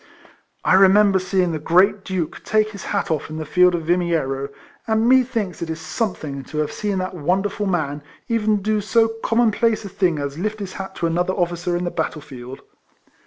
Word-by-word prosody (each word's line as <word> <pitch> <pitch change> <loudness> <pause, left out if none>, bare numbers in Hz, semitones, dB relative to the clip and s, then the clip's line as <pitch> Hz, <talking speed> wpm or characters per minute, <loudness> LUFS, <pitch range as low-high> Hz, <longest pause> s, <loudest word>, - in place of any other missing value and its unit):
I - - +4
remember 195 +1 +6
seeing 185 -1 0
the 155 - -3
great 185 +6 +3
Duke 180 -5 -4
take 215 0 +1
his 200 - -9
hat 200 -4 -1
off 155 -2 -2
in 155 - -6
the 155 - -4
field 180 +3 +4
of 165 - -3
Vimiero, 160 -6 0 0.4
and 220 +1 +2
me 260 +1 +6
thinks 225 -7 -3
it 170 - -3
is 160 0 -4
something 160 - -3
to 155 - -8
have 150 -1 0
seen 205 -2 -2
that 185 0 -3
wonderful 190 +5 -1
man 150 -6 -1 0.3
even 215 -3 +1
do 215 0 +1
so 225 +2 +3
common 230 0 +3
place 225 0 0
a - - -6
thing 185 -4 +1
as 140 +1 -4
lift 215 +3 -2
his 195 -2 -6
hat 195 0 -7
to - - -2
another 175 +3 0
officer 175 -1 -1
in 175 - -3
the 175 - -2
battle 160 -1 -2
field. 130 -3 -10
185 Hz, 205 wpm, -21 LUFS, 160-210 Hz, 0.4 s, remember